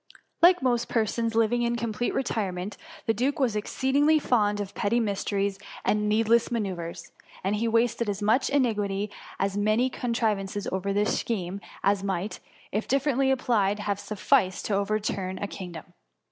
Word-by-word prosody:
Like 350 -3 +6
most 240 -2 +1
persons 225 0 0
living 230 +2 +3
in 240 0 +1
complete 235 0 -2
retire 220 -7 -1
ment, 180 +3 -5 0.3
the 225 - +2
duke 260 +7 0
was 255 -7 +1
exceedingly 275 +8 +2
fond 210 -8 +2
of 200 -1 -4
petty 220 +4 +1
mysteries 200 -2 -1 0.3
and 210 0 +2
needless 225 +2 +3
manoeuvres, 185 -7 -4 0.3
and 200 +3 0
he 230 +2 0
wasted 230 0 +1
as 200 -1 -2
much 220 +5 +2
ingenuity 210 -7 0 0.3
and - - +1
as 200 0 -3
many 215 +5 +2
con 245 -1 -3
trivances 205 -4 -1
over 190 +1 -1
this 205 +2 +1
scheme, 195 -3 -3 0.2
as 200 0 +2
might, 195 +1 -2 0.3
if 215 +2 -2
differ 275 +2 +2
ently 265 +1 +2
applied, 215 -6 +2
have 205 -1 -2
sufficed 205 -2 +1
to 210 - -1
overturn 200 -2 -1
a - - -3
kingdom. 180 -4 -8
215 Hz, 165 wpm, -27 LUFS, 200-240 Hz, 0.3 s, Like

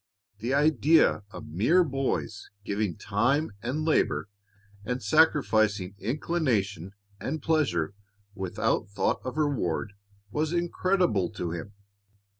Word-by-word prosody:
The 120 +5 0
idea 150 -1 +4
of 105 - -9
mere 115 - +3
boys 135 - -2 0.2
giving 100 -2 -1
time 120 +9 +1
and 145 +6 -2
labor 155 -8 +1 0.5
and 125 +4 -3
sacrificing 110 - +3
inclination 105 - -1 0.3
and 155 +3 -3
pleasure 145 - +1 0.4
without 95 -1 -1
thought 100 - 0
of 130 +1 -5
reward 115 - 0 0.4
was 155 +2 -1
incredible 175 - +1
to 85 -4 -3
him. 85 +5 -6
125 Hz, 105 wpm, -27 LUFS, 100-155 Hz, 0.5 s, idea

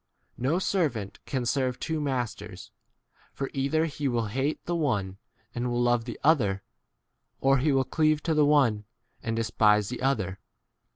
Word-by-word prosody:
No 135 +7 +1
servant 150 - -1
can 130 -3 -2
serve 130 0 0
two 160 -1 -2
masters, 130 -5 -4 0.6
for 135 - -4
either 140 +4 +1
he 150 -2 -3
will 120 -3 0
hate 135 +7 -1
the 175 - -1
one 100 - -1 0.3
and 120 +1 -2
will 120 0 -1
love 120 -1 +2
the 120 - -7
other, 110 -11 +3 0.8
or 135 0 +3
he 145 +3 +2
will 135 -1 +3
cleave 155 0 +1
to 165 - +1
the 150 -1 +4
one 135 -8 +3 0.4
and 115 -1 -2
despise 105 -2 +3
the 125 - -5
other. 100 -8 0
130 Hz, 160 wpm, -27 LUFS, 115-150 Hz, 0.8 s, the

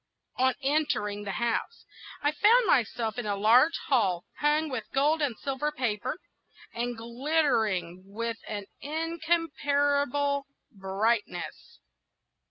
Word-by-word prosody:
On 260 0 +3
entering 210 -8 0
the 195 - -3
house, 235 - -2 0.4
I 290 - +3
found 450 +10 +5
myself 235 - +1
in 230 - -4
a 205 - 0
large 235 +10 +5
hall 195 -10 +1
hung 300 +1 +2
with 255 -7 -4
gold 300 +4 +2
and 265 -7 0
silver 280 +2 -2
paper, 250 -3 -2 0.6
and 240 0 -3
glittering 230 - 0
with 230 +3 -4
an 205 -2 -4 0.2
incomparable 290 -3 0 0.2
brightness. 205 +2 -2
255 Hz, 110 wpm, -28 LUFS, 220-295 Hz, 0.6 s, found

